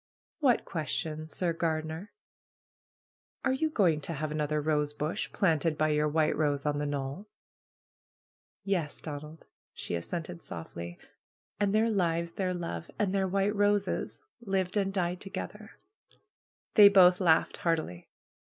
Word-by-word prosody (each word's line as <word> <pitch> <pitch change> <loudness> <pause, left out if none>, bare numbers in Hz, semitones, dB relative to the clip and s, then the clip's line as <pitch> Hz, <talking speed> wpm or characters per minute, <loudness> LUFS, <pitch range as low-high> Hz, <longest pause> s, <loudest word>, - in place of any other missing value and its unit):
"What 260 -7 +3
question, 155 -1 -3
Sir 170 +1 0
Gardener?" 160 +3 -2 1.3
"Are 260 - +3
you 315 +4 0
going 175 - +2
to 165 - -2
have 155 0 -3
another 150 0 0
rosebush 150 0 -1
planted 160 -4 +1
by 155 0 +2
your 150 0 +2
white 155 +1 +2
rose 145 -2 0
on 145 -1 0
the 145 - -1
knoll?" 145 +7 -4 1.4
"Yes, 180 -7 -1
Donald!" 150 +1 -8 0.3
she - - -5
assented 85 - -4
softly. 85 +1 -7 0.6
"And 205 -1 +2
their 225 +1 +3
lives, 170 -4 0
their 185 0 -1
love, 165 - -5
and 200 -2 0
their 195 -1 +1
white 195 +2 +1
roses, 205 0 +1 0.2
lived 190 -4 -1
and 195 -2 +1
died 180 -2 -1
ttrgetheir' 210 +2 -7 0.6
!" - - -68
They 205 -2 +9
both 185 -2 +6
laughed 160 -3 +3
happily. 160 - -2
165 Hz, 135 wpm, -30 LUFS, 150-195 Hz, 1.4 s, They